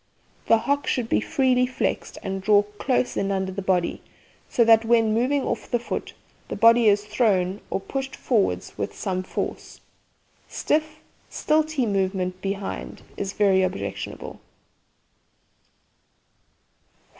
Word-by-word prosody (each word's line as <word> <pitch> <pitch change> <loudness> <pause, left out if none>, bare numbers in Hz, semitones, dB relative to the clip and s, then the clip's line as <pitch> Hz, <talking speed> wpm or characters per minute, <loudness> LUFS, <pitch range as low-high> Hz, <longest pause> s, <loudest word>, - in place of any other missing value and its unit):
The 225 - +6
hocks 285 +5 -1
should 235 -3 -1
be - - +2
freely 255 -2 +2
flexed 255 - -3
and 195 -1 -3
drawn 205 +1 +4 0.2
close 255 -2 0
in 195 - -1
under 190 -1 -1
the 195 +1 -4
body, 185 -2 0 0.5
so 235 - +3
that, 225 0 +6
when 225 -1 +3
moving 260 +5 +1
off - - -3
the 240 - +2
foot, 240 - -5 0.3
the - - -4
body 230 +2 +5
is 205 0 +3
thrown 205 -3 +1
or - - -1
pushed 270 +6 -5
forward 195 - +1
with 100 -1 -4
some 185 -2 -2
force. 185 - -5 0.7
Stiff, 310 0 -1 0.3
stilty 310 -3 +1
movement 190 -2 -1
behind 195 0 -5
is 195 -1 -4
very 195 -2 +3
objectionable. 100 - -4
210 Hz, 130 wpm, -24 LUFS, 190-250 Hz, 0.7 s, The